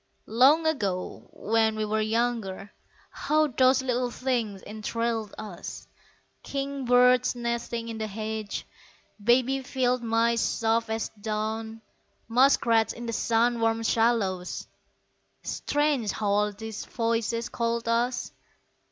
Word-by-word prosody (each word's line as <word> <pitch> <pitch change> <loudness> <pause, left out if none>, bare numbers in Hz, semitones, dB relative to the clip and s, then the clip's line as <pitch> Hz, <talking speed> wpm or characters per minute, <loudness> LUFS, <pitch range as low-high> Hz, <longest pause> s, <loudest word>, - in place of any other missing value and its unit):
Long 275 +8 +4
ago, 200 -13 -2
when 220 0 +1
we 215 0 -1
were 215 +1 0
younger, 215 -3 -1 0.4
How 310 +1 +1
those 260 -1 +3
little 250 -1 0
things 235 -6 -2
enthralled 220 0 -3
us; 200 -5 -8 0.5
King 275 -1 -4
birds 250 0 +4
nesting 235 -1 -3
in 225 -1 -5
the 220 - -2
hedges, 215 0 -4 0.6
Baby 255 +4 +3
field 255 -1 0
mice 230 0 +2
soft 225 0 +1
as 220 0 -2
down, 220 +1 -4 0.4
Muskrats 230 -2 +3
in 240 - -8
the 230 - -3
sun 235 +2 +2
warmed 225 0 +1
shallows 220 -6 0 0.8
Strange 290 -6 0
how 210 -2 -2
all 210 +1 +2
these 220 +1 -7
voices 230 0 -1
called 235 0 -2
us! 240 +2 0
230 Hz, 115 wpm, -27 LUFS, 220-245 Hz, 0.8 s, Long